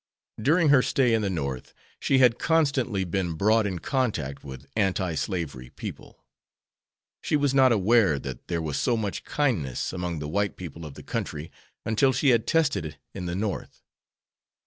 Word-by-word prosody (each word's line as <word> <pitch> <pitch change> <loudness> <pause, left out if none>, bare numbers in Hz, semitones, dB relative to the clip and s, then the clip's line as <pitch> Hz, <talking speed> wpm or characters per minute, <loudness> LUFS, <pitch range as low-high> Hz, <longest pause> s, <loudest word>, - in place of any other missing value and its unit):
During 155 +6 +3
her 140 -3 +6
stay 125 -2 +2
in 110 - +2
the 100 - 0
North 70 -8 -4 0.2
she 135 - +2
had 125 -3 +5
constantly 135 -11 +1
been 90 -1 -2
brought 110 +5 +3
in 95 -3 -3
contact 95 - -2
with 65 -1 -9
anti 95 -4 +1
slavery 75 -7 -3
people. - - -9 1.0
She - - 0
was 145 -2 +2
not 130 -2 +5
aware 105 -6 +4
that 65 -2 -7
there 85 -2 -2
was 75 -2 -2
so 120 -2 +1
much 105 -3 -3
kindness 105 - -1
among 90 -2 -3
the 75 0 -4
white 100 +5 -1
people 85 -2 -8
of 70 - -11
the - - -11
country 75 +1 -4 0.3
until 110 +5 +3
she 140 - +2
had 115 -3 +3
tested 155 - +2
it 80 - -7 0.2
in 90 -2 -5
the 85 - -3
North. 100 0 -4
100 Hz, 170 wpm, -26 LUFS, 80-125 Hz, 1.0 s, her